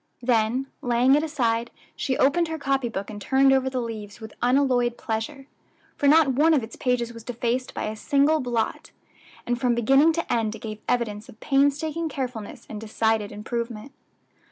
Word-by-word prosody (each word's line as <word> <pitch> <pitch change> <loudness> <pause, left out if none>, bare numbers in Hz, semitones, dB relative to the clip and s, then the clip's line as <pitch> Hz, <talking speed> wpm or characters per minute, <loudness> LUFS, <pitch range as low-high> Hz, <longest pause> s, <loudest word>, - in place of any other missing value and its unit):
Then, 240 +2 +1 0.2
laying 245 +2 +3
it 295 - +4
aside, 240 -7 0 0.3
she 260 -3 -1
opened 330 +5 +3
her 320 0 -4
copy 270 -4 0
book 200 -1 -5
and 205 -1 -8
turned 270 +5 +4
over 265 0 +2
the 260 -1 -2
leaves 220 -3 -6
with 220 -1 -9
unalloyed 245 -2 +2
pleasure, 230 +5 -4 0.5
for 285 - +1
not 305 0 +6
one 310 +5 +4
of 265 - +1
its 220 - -8
pages 240 -2 -1
was 230 -1 -10
defaced 245 +1 -2
by - - -3
a 215 - -3
single 285 +7 +2
blot, 240 -4 -2 0.6
and 240 0 -2
from 245 -2 +2
beginning 270 +7 +4
to 335 +1 -2
end 225 -2 0
it - - -10
gave 215 -1 -7
evidence 220 -4 -1
of 220 - -14
painstaking 295 +4 +1
carefulness 245 -5 -6
and 215 -1 -7
decided 220 -1 0
improvement. 230 +3 -5
245 Hz, 180 wpm, -25 LUFS, 225-275 Hz, 0.6 s, not